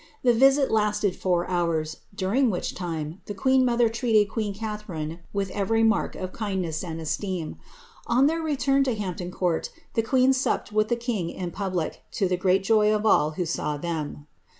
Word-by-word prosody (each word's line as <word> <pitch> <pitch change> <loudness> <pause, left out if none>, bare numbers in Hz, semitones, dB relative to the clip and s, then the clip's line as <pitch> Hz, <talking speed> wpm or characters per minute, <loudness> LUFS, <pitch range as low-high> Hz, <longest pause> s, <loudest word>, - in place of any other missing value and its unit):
The 245 -2 +5
visit 270 +3 +4
lasted 210 -3 +1
four 175 -2 0
hours, 165 -3 -1 0.2
during 220 +8 +2
which 180 -4 -2
time 165 -1 -5
the 205 - -5
queen 260 +6 +3
mother 240 -1 +3
treated 220 -3 +2
queen 215 -3 -1
Catharine 200 -7 -5
with 200 -2 -2
every 215 +3 +1
mark 225 0 +2
of 185 0 -5
kindness 190 -7 -2
and 165 -2 -5
esteem. 170 +1 -3 0.5
On 250 +3 +4
their 325 +3 +1
return 275 -3 +2
to 255 -4 0
Hampton 180 -4 -4
Court 180 -2 -1 0.2
the 225 - +2
queen 255 +3 +3
supped 260 -4 -1
with 215 0 +2
the 240 - +1
king 230 -8 -2
in 180 -1 -5
poUic, 185 -3 -2 0.2
to 195 - +1
the 180 - +1
great 185 +1 +2
joy 215 0 +4
of 215 0 0
all 155 -7 +4
who 180 - 0
saw 150 -2 -2
them.'" 150 -2 -4
200 Hz, 180 wpm, -25 LUFS, 175-225 Hz, 0.5 s, The